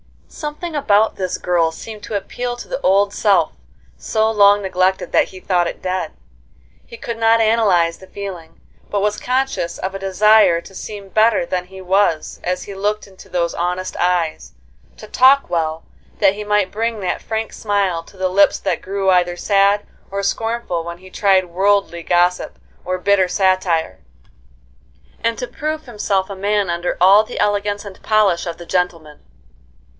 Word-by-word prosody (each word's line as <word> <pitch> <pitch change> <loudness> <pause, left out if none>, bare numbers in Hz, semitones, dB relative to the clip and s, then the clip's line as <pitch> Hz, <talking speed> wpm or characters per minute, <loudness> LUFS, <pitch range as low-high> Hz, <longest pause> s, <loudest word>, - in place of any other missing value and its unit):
Something 305 +2 -6
about 220 -6 +2
this 185 -2 -2
girl 170 -2 +1
seemed 215 +6 -9
to 215 - -5
appeal 245 +4 -3
to 245 - -10
the 265 - -4
old 200 +2 +3
self, 205 -3 +2 0.5
so 220 0 0
long 205 -1 +5
neglected 190 0 0
that - - +4
he 185 - -12
thought 180 -3 +1
it - - -7
dead. 185 -3 -3 0.7
He 235 - -11
could 230 0 -5
not 225 0 +4
analyze 200 -7 +2
the 190 - -14
feeling, 185 -6 -8 0.3
but 205 - -1
was 210 +1 0
conscious 255 -9 -1
of 190 +1 -4
a 195 - -5
desire 195 -1 +4
to 195 - -15
seem 200 0 -8
better 230 +6 +3
than 180 -7 -3
he 190 +1 -12
was 185 -3 0
as 180 +1 -2
he 200 - -8
looked 205 +2 -2
into 190 -2 -16
those 170 -2 -1
honest 180 +2 -3
eyes; 175 -3 -1 0.4
to - - -10
talk 270 +2 +4
well, 160 -1 -1 0.4
that 195 -2 +4
he 210 +1 -6
might 210 -2 +1
bring 225 0 -2
that 180 -2 -2
frank 220 0 -3
smile 200 -5 -1
to 190 - -18
the 185 0 0
lips 200 +2 +4
that 185 -4 -2
grew 195 0 -1
either 175 -1 +2
sad 200 +2 +2 0.2
or 200 0 -3
scornful 225 -4 -2
when 170 0 -7
he 185 0 -15
tried 190 -2 +3
worldly 195 -1 +1
gossip 175 +2 +1 0.3
or 185 +1 -1
bitter 190 0 +2
satire; 180 - 0 1.2
and 230 0 0
to 250 - -3
prove 310 +4 -4
himself 205 -5 -1
a 200 - -6
man 200 0 0
under 170 +1 -2
all 195 +4 +6
the - - -7
elegance 205 0 0
and 195 -2 -11
polish 205 -6 +2
of 170 -1 -5
the 175 - -10
gentleman. 165 -4 -2
195 Hz, 170 wpm, -19 LUFS, 180-210 Hz, 1.2 s, all